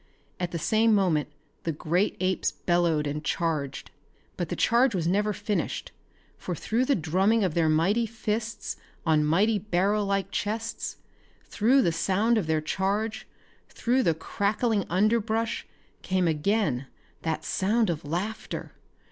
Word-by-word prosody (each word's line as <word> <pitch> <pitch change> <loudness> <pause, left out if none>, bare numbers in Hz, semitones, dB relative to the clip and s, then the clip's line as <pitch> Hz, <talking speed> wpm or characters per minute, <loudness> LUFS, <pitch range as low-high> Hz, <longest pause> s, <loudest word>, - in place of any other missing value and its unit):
At 180 -1 -1
the 170 - -4
same 215 +7 +3
moment 175 -7 +2 0.3
the 165 - -1
great 170 +6 0
apes 185 0 +1
bellowed 170 -4 +1
and 150 +1 -3
charged. 150 -5 -2 0.4
But 175 -3 -3
the - - -2
charge 235 0 +3
was 170 -3 -1
never 205 +4 +2
finished, 210 0 -3 0.5
for 180 - -4
through 230 - 0
the 280 - +3
drumming 190 +7 +2
of 180 -5 0
their 165 -1 +2
mighty 195 +9 +2
fists 220 +1 -3 0.3
on 155 -2 +3
mighty 200 +8 +3
barrel 200 +2 +1
like 195 -1 -1
chests, 220 +2 -3 0.5
through 250 +5 +3
the 170 - +2
sound 210 +7 +2
of 175 - -3
their 160 -1 +1
charge, 205 +7 -1 0.4
through 250 +2 +1
the 165 -10 +2
crackling 205 +5 0
underbrush 220 +4 +1 0.3
came 185 -1 +1
again 155 - 0 0.3
that 160 -1 -2
sound 210 +1 +1
of 160 -2 -4
laughter. 180 +9 -4
195 Hz, 140 wpm, -27 LUFS, 165-220 Hz, 0.5 s, same